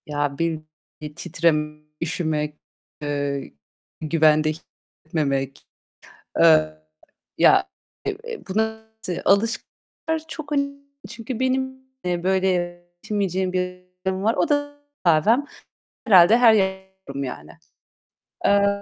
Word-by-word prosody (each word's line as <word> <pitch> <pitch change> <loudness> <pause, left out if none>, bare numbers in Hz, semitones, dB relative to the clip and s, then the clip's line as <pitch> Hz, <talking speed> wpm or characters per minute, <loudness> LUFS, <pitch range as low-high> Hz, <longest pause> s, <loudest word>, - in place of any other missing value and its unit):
Ya, 145 -2 -2
bir 165 0 0 0.4
bir 150 -1 -7
titreme, 150 -2 0 0.2
üşümek, 155 -3 -1 0.5
eee, 145 - -3 0.5
güvende 155 -1 +3
hissetmemek. 140 -4 -4 0.8
Eee, 155 -2 +6 0.6
ya, - - +5 0.6
eee, 465 -2 -6
buna 220 +2 -1 0.4
alışkınlar 230 +9 0
çok 310 -2 -8 0.6
çünkü 230 +1 -6
benim, 260 0 0 0.3
eee, 175 -1 -1
böyle 190 0 +2
yaşayamayacağım 180 +1 -2
bir 180 0 -2 0.2
durum 190 0 -1
var. 225 +2 +2
O 335 - +1
da 290 0 0 0.3
kahvem. 185 - +4 0.6
Herhâlde 195 +1 +7
her 235 -3 +7
yerde 190 -2 0 0.2
olurum 140 0 -4
yani. 80 - -7 1.0
Eee, 200 0 +5
175 Hz, 100 wpm, -23 LUFS, 155-220 Hz, 1.0 s, Herhâlde